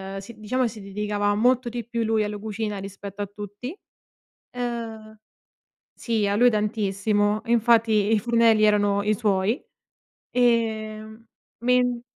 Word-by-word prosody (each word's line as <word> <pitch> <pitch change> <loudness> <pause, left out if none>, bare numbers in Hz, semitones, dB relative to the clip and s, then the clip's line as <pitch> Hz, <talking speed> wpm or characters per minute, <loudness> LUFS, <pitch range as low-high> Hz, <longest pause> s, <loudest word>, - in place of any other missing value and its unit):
ehm, - - -4
sì, 215 +3 -12
diciamo, 250 +4 0
si 225 -2 -9
dedicava 205 +1 -1
molto 245 +3 +2
di 235 -1 -5
più 235 -1 -2
lui 220 -1 +1
alla 210 0 -4
cucina 210 0 -4
rispetto 195 +1 -8
a - - -1
tutti. 205 - -8 0.8
Ehm 225 -3 -5 0.8
sì, 225 -3 -1
a 200 - +1
lui 245 +3 +5
tantissimo, 210 -1 0
infatti 225 -2 +3
i 220 - +4
fornelli 230 -1 +3
erano 205 -1 +3
i 215 +1 +2
suoi. 205 +2 0 0.7
Ehm, 220 -2 0 0.4
men 245 -1 +2
215 Hz, 135 wpm, -24 LUFS, 205-235 Hz, 0.8 s, lui